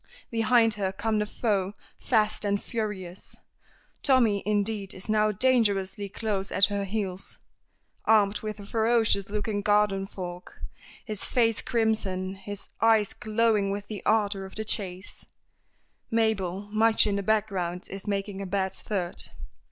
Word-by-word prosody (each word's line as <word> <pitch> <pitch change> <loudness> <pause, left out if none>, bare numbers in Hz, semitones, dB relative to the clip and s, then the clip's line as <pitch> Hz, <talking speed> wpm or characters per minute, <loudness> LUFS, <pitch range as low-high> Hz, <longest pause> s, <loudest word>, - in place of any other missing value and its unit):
Behind 225 0 +4
her 195 -2 -1
come 210 +2 -1
the 210 - -1
foe, 200 -4 0 0.3
fast 215 -3 +2
and 200 -1 +1
furious. 200 -6 -5 0.7
Tommy, 235 -7 +3
indeed, 205 -1 0
is 185 - -8
now 215 0 +3
dangerously 205 -4 +1
close 200 -2 -2
at 195 - +5
her 200 -1 -1
heels, 195 -2 -4 0.7
armed 210 -2 +4
with 215 -1 -5
a 200 - -9
ferocious 220 -2 +2
looking 210 0 -2
garden 205 -1 +2
fork, 180 -2 -8 0.4
his 215 -3 -3
face 230 -3 +2
crimson, 205 -5 0
his 200 +1 -8
eyes 220 -2 +4
glowing 220 -3 +1
with 200 +1 -3
the 210 -3 -5
ardor 205 -3 +1
of 190 - -10
the 220 - -4
chase; 190 -3 -2 0.9
Mabel, 205 -4 0
much 220 +1 +4
in 205 -2 0
the 200 - 0
background, 195 -4 -1
is 195 +2 -7
making 200 -1 -2
a 195 - -4
bad 190 0 -1
third. 185 -4 -3
205 Hz, 140 wpm, -27 LUFS, 195-220 Hz, 0.9 s, at